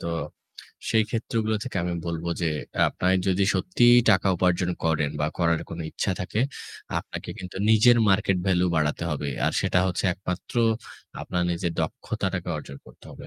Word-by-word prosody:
তো - - -6 0.8
সেইক্ষেত্রগুলো 110 0 0
থেকে 125 - -5
আমি 90 - -2
বলব 85 -1 -3 0.2
যে 85 - +2 0.4
আপনার 90 +1 +1
যদি 95 +1 +2
সত্যিই 120 -9 +5
টাকা 95 0 +3
উপার্জন 90 0 +1
করেন 80 -3 +1
বা 75 - +2
করার 85 -2 +2
কোন 85 - -6
ইচ্ছা 95 - -1
থাকে, 90 +4 -2 0.6
আপনাকে - - -7
কিন্তু 90 0 -8
নিজের 115 +2 +6
মার্কেট 95 -1 +3
ভ্যালু 90 -1 +3
বাড়াতে 75 +1 0
হবে। 75 -1 -2 0.2
আর - - +1
সেটা - - +2
হচ্ছে 90 +1 -2
একমাত্র 90 -1 -6 0.7
আপনার 90 - -2
নিজের 85 0 -1
দক্ষতাটাকে - - -3
অর্জন 70 - -8
করতে - - -17
হবে। - - -11
90 Hz, 155 wpm, -25 LUFS, 85-105 Hz, 0.8 s, নিজের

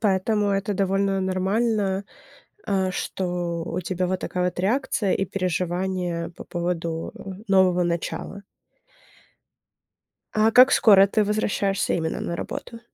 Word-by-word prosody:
поэтому 205 +1 +1
это 195 +1 0
довольно 195 0 0
нормально, 195 +1 0 0.6
а, 190 -2 +1
что 175 -2 -3
у 180 - -3
тебя 180 +1 -2
вот 185 0 -2
такая 180 0 -2
вот 180 0 -2
реакция 215 -1 0
и 195 - 0
переживания 180 -1 -2
по - - -9
поводу 170 -2 -3 0.4
нового 185 -2 +4
начала. 175 +3 -3 1.9
А 215 +1 +3
как 255 +3 +7
скоро 195 -3 +7
ты 210 +1 +1
возвращаешься 200 -2 0
именно 160 -2 -2
на 170 - -3
работу? 230 +5 -6
190 Hz, 120 wpm, -24 LUFS, 180-200 Hz, 1.9 s, как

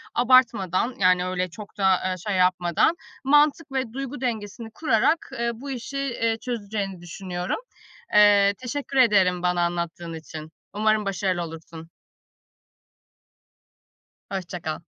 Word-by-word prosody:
abartmadan, 240 -4 +3
yani 185 -1 +4
öyle 185 0 -2
çok 205 +2 -11
da, 190 -2 +4
eee, 185 - -1
şey 205 - 0
yapmadan, 180 - +2 0.3
mantık 295 +2 +3
ve 260 -4 -2
duygu 275 0 -5
dengesini 225 -2 -4
kurarak, 280 +4 +1
eee, 235 0 0
bu 270 +5 -8
işi, 260 +2 -5
eee, 230 -4 -1
çözeceğini 205 -6 -4
düşünüyorum. 175 - -4 0.5
Eee, 205 -1 +6
teşekkür 270 +2 -4
ederim 190 -8 +4
bana 180 -1 +1
anlattığın 170 -1 -3
için, 160 -1 -9 0.2
umarım 215 0 +1
başarılı 190 -2 -1
olursun. 165 0 -10 2.4
Hoşça 180 -2 -5
kal. 155 -1 -4
205 Hz, 120 wpm, -24 LUFS, 180-245 Hz, 2.4 s, Eee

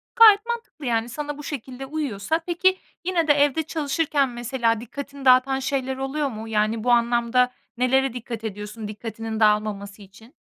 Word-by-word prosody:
Gayet 435 -2 +8
mantıklı 470 - -5
yani, 230 -1 0
sana 295 +3 -5
bu 295 - -9
şekilde 265 -2 -6
uyuyorsa. 285 -1 -2
Peki, 370 +2 +2 0.3
yine 345 -3 +1
de 295 - +7
evde 290 +2 +2
çalışırken 295 -2 0
mesela 240 -2 -1
dikkatini 280 +3 -8
dağıtan 260 +1 +5
şeyler 265 -1 -2
oluyor 275 +2 -1
mu? 220 -2 -7
Yani, 215 0 0
bu 245 - +2
anlamda 240 +1 +3 0.3
nelere 265 0 +2
dikkat 235 -2 -6
ediyorsun 210 +1 -6
dikkatinin 220 +1 -6
dağılmaması 210 -1 +1
için? 210 - -16
255 Hz, 155 wpm, -24 LUFS, 225-290 Hz, 0.3 s, Gayet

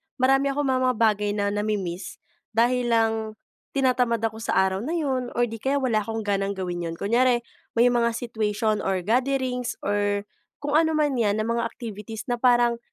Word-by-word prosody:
marami 270 +1 +3
akong 285 +1 0
mga 255 -1 +2
bagay 210 -2 +2
na 200 -1 0
na-mi-miss 200 -4 -3 0.4
dahil 245 +1 +2
lang 225 -1 +3 0.6
tinatamad 250 -4 +2
ako 220 0 -1
sa 225 - -2
araw 190 0 +2
na 315 +9 -2
'yon, 260 -6 -1
or 240 - +3
'di 225 -1 -7
kaya, 275 +1 +1
wala 245 -6 +1
akong 225 +1 -4
ganang 200 0 0
gawin 180 -2 -3
'yon. 165 - -5
Kunyari, 240 +3 +2 0.3
may 235 - +6
mga 235 -1 +1
situation, 215 -2 -1
or 190 -2 -1
gatherings, 250 +1 0
or 205 0 0 0.3
kung 290 0 -4
anuman 310 -2 +3
'yan, 220 -4 +1
na 215 - -1
mga 235 +1 0
activities 220 -2 -8
na 240 - -1
parang, 240 -2 +4
230 Hz, 170 wpm, -25 LUFS, 210-255 Hz, 0.6 s, may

